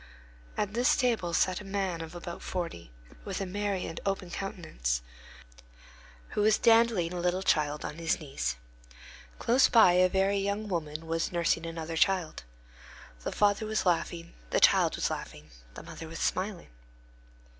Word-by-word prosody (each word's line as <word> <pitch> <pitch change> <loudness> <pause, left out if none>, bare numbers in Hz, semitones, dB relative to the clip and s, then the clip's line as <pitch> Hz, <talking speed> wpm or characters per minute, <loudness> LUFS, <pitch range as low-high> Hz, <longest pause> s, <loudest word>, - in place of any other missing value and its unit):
At 210 -1 -1
this 245 +2 +3
table 235 -10 +1
sat 185 +3 +1
a - - -9
man 195 -4 -2
of 165 +1 -8
about 175 0 -7
forty, 170 - -5 0.3
with - - -4
a 195 - -2
merry 200 0 -2
and 165 - -6
open 195 -2 -2
countenance, - - -3 1.3
who - - -1
was 215 0 +4
dandling 225 -7 +4
a 180 - -3
little 180 +2 0
child 150 -4 +1
on 150 - -6
his 165 -1 0
knees. 140 - -3 0.8
Close 250 +3 +4
by 225 -6 +7
a 180 +1 +4
very 195 +1 +2
young 200 +2 -2
woman 160 -4 -3
was 165 0 -1
nursing 170 -1 0
another 165 0 -5
child. 180 -3 +1 0.8
The - - -3
father 205 +1 +2
was 215 -1 -1
laughing, 170 -1 -1 0.2
the - - +2
child - - +5
was - - -1
laughing, 75 -1 -7 0.2
the - - -9
mother 165 - -9
was 165 +1 -8
smiling. 190 +1 -2
180 Hz, 155 wpm, -29 LUFS, 165-200 Hz, 1.3 s, by